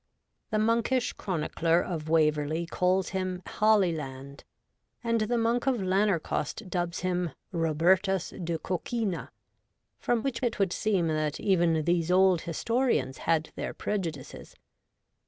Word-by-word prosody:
The 215 - 0
monkish 230 +3 +1
chronicler 165 -2 0
of 160 -3 -4
Waverley 155 0 +2
calls 180 +2 +1
him 185 -1 -3 0.2
Halieland, 155 -10 +1 0.6
and 230 -1 +1
the 235 +3 0
Monk 235 +3 +1
of 265 - +3
Lanercost 190 -1 0
dubs 175 -1 -2
him 180 -4 -1
' - - -41
Robertus 175 +3 +2
de 165 -1 -1
Coquini,' 190 +2 -3 0.7
from 235 -2 0
which 265 -4 -2
it 240 -3 -1
would 195 -3 +1
seem 195 -6 +1
that 155 -2 -1
even 170 -5 +2
these 170 -1 +1
old 185 -2 +4
historians 230 - 0
had 160 -1 +2
their - - -5
prejudices. 165 -10 -5
180 Hz, 125 wpm, -28 LUFS, 165-215 Hz, 0.7 s, old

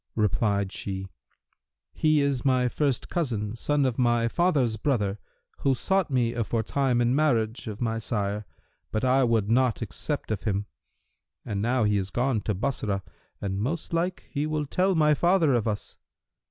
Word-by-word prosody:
Replied 100 -1 +1
she, 95 -1 -4 0.8
'He 155 -1 +3
is 140 -3 0
my 130 -2 +3
first 135 0 0
cousin, 115 -10 -2
son 145 +3 +1
of 130 -2 -1
my 120 -1 +3
father's 140 -6 +2
brother[FN#339] 105 -5 0 0.4
who 135 -1 +2
sought 190 +4 +1
me 120 -3 +1
aforetime 120 +2 0
in 120 +1 +2
marriage 120 -7 +1
of 105 0 -6
my 115 -1 0
sire; 105 -2 -2 0.4
but 110 - -1
I 130 +1 +4
would 115 -3 +1
not 125 -1 +2
accept 115 - -4
of 105 - -1
him. 100 -1 -1 0.8
And 100 -2 -2
now 120 +2 +2
he 105 -1 +2
is 95 -1 -2
gone 120 -1 0
to 105 - 0
Bassorah 100 -3 -2 0.4
and 95 -1 -2
most 155 +8 -3
like 175 +2 -1
he 150 0 -2
will 155 -1 -1
tell 185 +6 +1
my 150 -1 +4
father 170 -2 +3
of 115 -2 +1
us.' 105 -1 -3
120 Hz, 165 wpm, -27 LUFS, 105-140 Hz, 0.8 s, I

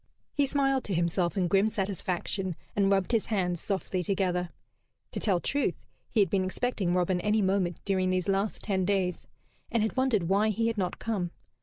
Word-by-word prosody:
He 285 -2 +2
smiled 270 -1 +1
to 195 - -1
himself 170 +2 +1
in 180 -2 +2
grim 195 +4 +3
satisfaction, 190 -2 -2 0.2
and 200 -1 +3
rubbed 195 0 +2
his 230 -3 +1
hands 180 -5 0
softly 190 -2 -2
together. 180 -1 0 0.6
To - - -3
tell 190 -5 +2
truth, 285 +10 0 0.3
he 220 - +3
had 195 - +3
been 195 -2 +2
expecting 190 -1 -1
Robin 180 0 +1
any 210 +1 +2
moment 185 -3 +1
during 185 -2 +1
these 185 0 0
last 195 +2 0
ten 190 -3 0
days, 185 -2 0 0.4
and 230 -2 +2
had 220 - -1
wondered 260 -7 +2
why 200 +4 +3
he 225 +2 0
had 230 -1 0
not 180 -2 -1
come. 200 -6 -2
195 Hz, 185 wpm, -29 LUFS, 180-215 Hz, 0.6 s, grim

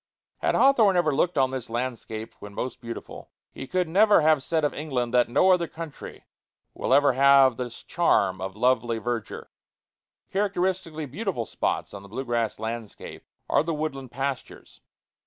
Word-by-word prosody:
Had - - +1
Hawthorne 225 -9 +5
ever 155 -4 +2
looked 160 +3 0
on 130 -1 +3
this 130 -4 -5
landscape 115 -2 -4
when 100 0 -10
most 130 - -4
beautiful, 115 -1 -8 0.2
he 135 - -8
could 180 +3 0
never 205 +3 +5
have 155 -2 +4
said 160 +2 0
of 145 - -1
England 130 -5 -3
that 125 -1 +3
"no 185 +10 +4
other 175 -2 +2
country 160 -3 -9 0.5
will - - -3
ever 140 0 +5
have 135 -1 +5
this 120 -2 -6
charm 95 - +1
of 95 0 -5
lovely 120 0 +1
verdure." 115 -2 -5 0.8
Characteristically 185 -5 -1
beautiful 160 - -3
spots - - -2
on 100 - -8
the 100 - -14
blue 130 +6 -5
grass 115 -2 -1
landscape 110 -1 -7 0.2
are - - +3
the 160 +1 -2
woodland 135 -4 -4
pastures. 135 +1 -6
135 Hz, 160 wpm, -25 LUFS, 120-165 Hz, 0.8 s, Hawthorne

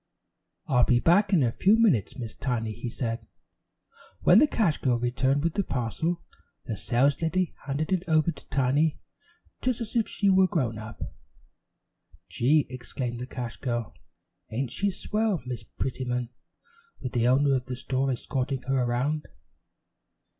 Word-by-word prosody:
"I'll 125 -2 +3
be 120 0 +4
back 190 - +4
in 170 -8 +4
a 120 - +2
few 200 - +4
minutes, 185 - +2
Miss 115 -4 -5
Tiny," 115 -4 -2
he 120 +3 -5
said. 115 -1 -4 0.9
When - - +7
the 300 - +6
cash 200 - +1
girl 125 -3 +2
returned 130 +4 +1
with 165 -1 +1
the 200 - 0
parcel, 160 - -2 0.4
the 115 - -3
saleslady 145 - +1
handed 145 +5 -2
it 185 -1 +1
over 160 +1 +3
to - - -14
Tiny 140 +4 +2 0.6
just 255 -2 0
as 230 -1 -5
if 230 -2 +2
she 200 - -1
were 190 -1 +5
grown 125 -11 -1
up. 110 0 -7 1.2
"Gee," 145 +5 +3
exclaimed 120 -1 -4
the 125 - -5
cash 120 -5 -5
girl, 120 -2 -3 0.6
"ain't 120 +2 -2
she 200 +9 0
swell, 210 - -1
Miss 125 -2 -4
Prettyman, 125 +1 -3 0.7
with 125 - -5
the 120 -2 +2
owner 135 +2 +4
of 125 0 -3
the 125 - -3
store 130 +2 -1
escorting 130 +1 -2
her 135 -1 +1
around!" 130 +6 -1
135 Hz, 155 wpm, -27 LUFS, 120-165 Hz, 1.2 s, When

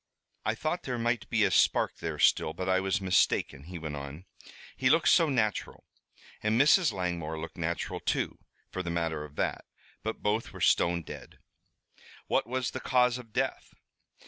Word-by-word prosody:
"I 110 - +1
thought 155 +8 -2
there 125 -2 -3
might 115 -1 -1
be - - +2
a - - +3
spark - - +3
there - - -4
still, 80 - +3
but 90 +3 -4
I 95 0 +3
was 95 +1 0
mistaken," 90 -6 +1
he 90 +1 -7
went 80 -2 -5
on. 70 +5 -8 0.5
"He 130 0 +2
looked 160 +3 +4
so 165 -3 +5
natural 110 -6 -1 0.6
and 110 +2 +1
Mrs. 150 +2 +5
Langmore 85 -5 -3
looked 80 0 -7
natural, 85 0 -3
too, - - -1 0.3
for 95 - -3
the 90 - -4
matter 80 -3 -1
of 75 -1 -11
that. - - -1 0.4
But 110 0 -5
both 110 +2 0
were - - -9
stone 85 0 +3
dead." - - -10 0.9
"What - - +1
was 130 0 -2
the - - -5
cause 125 -1 +2
of 115 -3 -12
death?" 130 +3 -2
95 Hz, 175 wpm, -29 LUFS, 85-125 Hz, 0.9 s, so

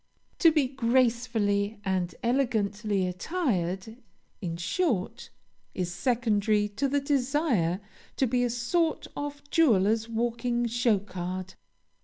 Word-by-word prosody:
To 330 - +7
be 300 -4 +2
gracefully 230 -5 +1
and 185 -3 -1
elegantly 215 -5 0
attired, 190 - -2 0.4
in 170 -3 -3
short, 190 - -1 0.5
is 175 -1 -2
secondary 215 -3 +1
to 210 +7 -1
the 285 +1 +1
desire 270 - +1 0.4
to 265 - +2
be 245 0 +1
a 245 - +1
sort 295 +8 0
of 290 0 -6
jeweler's 225 - +3
walking 235 +1 -1
show 235 -2 +2
card. 185 -1 -5
230 Hz, 110 wpm, -28 LUFS, 195-260 Hz, 0.5 s, To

